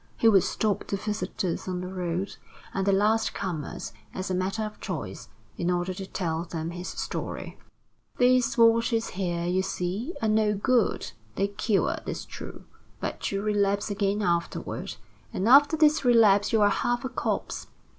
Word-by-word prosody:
He 230 Hz, -, +4 dB
would 200 Hz, -4 st, +7 dB
stop 210 Hz, +2 st, -1 dB
the 200 Hz, -, -1 dB
visitors 195 Hz, -3 st, -3 dB
on 180 Hz, -1 st, -2 dB
the 180 Hz, -, -5 dB
road 180 Hz, +1 st, -2 dB, 0.4 s
and 195 Hz, 0 st, -1 dB
the -, -, +5 dB
last 210 Hz, +3 st, +2 dB
comers 165 Hz, -11 st, -4 dB, 0.2 s
as 185 Hz, 0 st, -3 dB
a -, -, +1 dB
matter 190 Hz, +4 st, -1 dB
of 210 Hz, 0 st, -6 dB
choice, 155 Hz, -, -5 dB, 0.3 s
in 175 Hz, -, 0 dB
order 180 Hz, +1 st, 0 dB
to 190 Hz, +1 st, -7 dB
tell 165 Hz, -4 st, -2 dB
them 165 Hz, -1 st, -4 dB
his 180 Hz, +1 st, -6 dB
story: -, -, -5 dB, 0.6 s
"These 250 Hz, 0 st, +3 dB
waters 230 Hz, 0 st, +4 dB
here, 175 Hz, -2 st, -2 dB
you 180 Hz, +2 st, +1 dB
see, 190 Hz, -, -3 dB
are 225 Hz, -, 0 dB
no 215 Hz, -1 st, +3 dB
good 235 Hz, +3 st, +1 dB, 0.2 s
they 200 Hz, +1 st, +1 dB
cure, 205 Hz, 0 st, 0 dB
'tis -, -, -5 dB
true, -, -, -9 dB, 0.4 s
but -, -, -3 dB
you 195 Hz, 0 st, -2 dB
relapse 205 Hz, -1 st, +1 dB
again 200 Hz, +1 st, 0 dB
afterward, 170 Hz, -, -2 dB, 0.4 s
and 190 Hz, -, -1 dB
after 285 Hz, +5 st, +7 dB
this 305 Hz, -1 st, +4 dB
relapse 220 Hz, -5 st, +5 dB
you're 215 Hz, -2 st, +5 dB
half 240 Hz, +5 st, 0 dB
a -, -, -2 dB
corpse. 255 Hz, -, -3 dB
200 Hz, 165 wpm, -27 LUFS, 180-225 Hz, 0.6 s, would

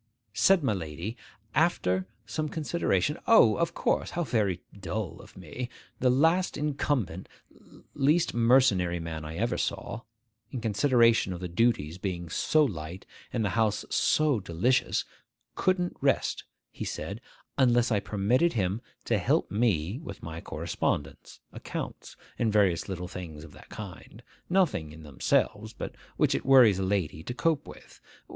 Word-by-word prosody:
Said 190 Hz, +4 st, +4 dB
my 115 Hz, -, +2 dB
lady, 85 Hz, +4 st, -5 dB, 0.4 s
after 95 Hz, +1 st, +1 dB, 0.2 s
some 155 Hz, +8 st, -3 dB
consideration, 150 Hz, -, 0 dB
'O, 170 Hz, -, +7 dB
of 170 Hz, 0 st, -1 dB
course, -, -, 0 dB
how 175 Hz, -, +1 dB
very 100 Hz, -, 0 dB, 0.2 s
dull 95 Hz, +1 st, -4 dB
of -, -, -16 dB
me! 125 Hz, -1 st, -6 dB, 0.3 s
The 130 Hz, -, +3 dB
last 165 Hz, +8 st, +3 dB
incumbent,—least 145 Hz, -, -2 dB
mercenary 115 Hz, -8 st, +3 dB
man 80 Hz, -1 st, -5 dB
I 80 Hz, +1 st, -6 dB
ever -, -, -1 dB
saw,—in 115 Hz, +1 st, -6 dB
consideration 115 Hz, -2 st, +3 dB
of 90 Hz, -, -6 dB
the 90 Hz, -, -4 dB
duties 90 Hz, -4 st, +1 dB
being 90 Hz, -3 st, -4 dB
so 155 Hz, +9 st, +3 dB
light 85 Hz, -, -6 dB, 0.3 s
and 115 Hz, -3 st, 0 dB
the -, -, +1 dB
house 110 Hz, -2 st, +1 dB
so 150 Hz, -6 st, +3 dB
delicious, 100 Hz, +8 st, +1 dB, 0.5 s
couldn't 180 Hz, -1 st, 0 dB
rest, -, -, +1 dB, 0.3 s
he -, -, -6 dB
said, -, -, -5 dB, 0.3 s
unless 120 Hz, -2 st, +3 dB
I 105 Hz, -, +3 dB
permitted 105 Hz, +11 st, +1 dB
him 100 Hz, 0 st, -1 dB, 0.2 s
to -, -, +1 dB
help -, -, +1 dB
me 100 Hz, -, +1 dB
with 100 Hz, -11 st, -9 dB
my 80 Hz, 0 st, -6 dB
correspondence, 70 Hz, -1 st, -3 dB
accounts, -, -, -6 dB, 0.2 s
and 115 Hz, -2 st, +2 dB
various 100 Hz, -4 st, +2 dB
little 90 Hz, -1 st, -4 dB
things 80 Hz, -4 st, -8 dB
of 80 Hz, -, -12 dB
that -, -, -16 dB
kind; 105 Hz, +3 st, -10 dB, 0.3 s
nothing 175 Hz, -, +1 dB
in 80 Hz, 0 st, -12 dB
themselves, 75 Hz, -3 st, 0 dB
but -, -, -6 dB, 0.2 s
which -, -, +3 dB
it -, -, -1 dB
worries 125 Hz, -8 st, +6 dB
a -, -, 0 dB
lady 95 Hz, -6 st, -1 dB
to 120 Hz, +9 st, -6 dB
cope 160 Hz, +1 st, 0 dB
with. -, -, -13 dB
110 Hz, 145 wpm, -28 LUFS, 90-130 Hz, 0.5 s, O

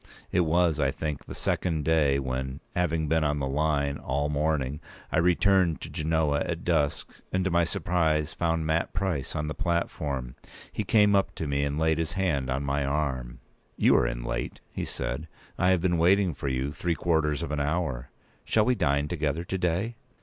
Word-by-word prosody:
It -, -, +2 dB
was, 85 Hz, -1 st, +2 dB
I 70 Hz, -2 st, +3 dB
think, 75 Hz, +1 st, -4 dB
the -, -, -8 dB
second 80 Hz, -5 st, -1 dB
day 75 Hz, -4 st, +3 dB
when, 65 Hz, 0 st, -3 dB, 0.2 s
having 80 Hz, -3 st, +1 dB
been 80 Hz, +1 st, +2 dB
on 75 Hz, -1 st, +1 dB
the 70 Hz, -, -1 dB
line 70 Hz, 0 st, 0 dB
all 70 Hz, +3 st, -1 dB
the -, -, -2 dB
morning, 75 Hz, -1 st, 0 dB, 0.3 s
I -, -, +2 dB
returned 90 Hz, 0 st, +3 dB
to -, -, -7 dB
Genoa 75 Hz, -2 st, +1 dB
at 85 Hz, 0 st, -3 dB
dusk, 75 Hz, -5 st, -1 dB
and, 95 Hz, 0 st, 0 dB
to 95 Hz, -, +1 dB
my 85 Hz, 0 st, +3 dB
surprise, 80 Hz, -2 st, 0 dB
found 80 Hz, -2 st, 0 dB
Mat 80 Hz, +1 st, 0 dB
Price 85 Hz, -7 st, -2 dB
on 75 Hz, 0 st, -1 dB
the 75 Hz, -, -2 dB
platform. 75 Hz, -7 st, -2 dB, 0.4 s
p. 110 Hz, -, -1 dB
199He -, -, -28 dB
came 105 Hz, -2 st, +5 dB
up 95 Hz, -, +1 dB
to 80 Hz, -, -3 dB
me, 70 Hz, -1 st, 0 dB
and 70 Hz, +1 st, -1 dB
laid 80 Hz, 0 st, +2 dB
his 80 Hz, -1 st, -2 dB
hand 85 Hz, -10 st, 0 dB
on 65 Hz, +2 st, -1 dB
my 70 Hz, +1 st, 0 dB
arm. 65 Hz, -3 st, -2 dB, 0.4 s
"You -, -, +5 dB
are -, -, +4 dB
in -, -, -3 dB
late," -, -, -3 dB
he -, -, -3 dB
said. 70 Hz, +7 st, -4 dB, 0.3 s
"I 90 Hz, -, +4 dB
have 95 Hz, -2 st, +3 dB
been 85 Hz, -2 st, +1 dB
waiting 90 Hz, +1 st, +4 dB
for 70 Hz, -, -5 dB
you 65 Hz, +1 st, -1 dB
three 85 Hz, +3 st, -1 dB
quarters 80 Hz, -3 st, +1 dB
of 80 Hz, -, -4 dB
an 75 Hz, -, -1 dB
hour. 70 Hz, -4 st, -1 dB, 0.3 s
Shall 110 Hz, -1 st, +2 dB
we 125 Hz, -, +3 dB
dine 75 Hz, -, +1 dB
together 80 Hz, -1 st, -1 dB
to 95 Hz, +2 st, -3 dB
day?" 95 Hz, +7 st, -1 dB
80 Hz, 200 wpm, -27 LUFS, 70-85 Hz, 0.4 s, came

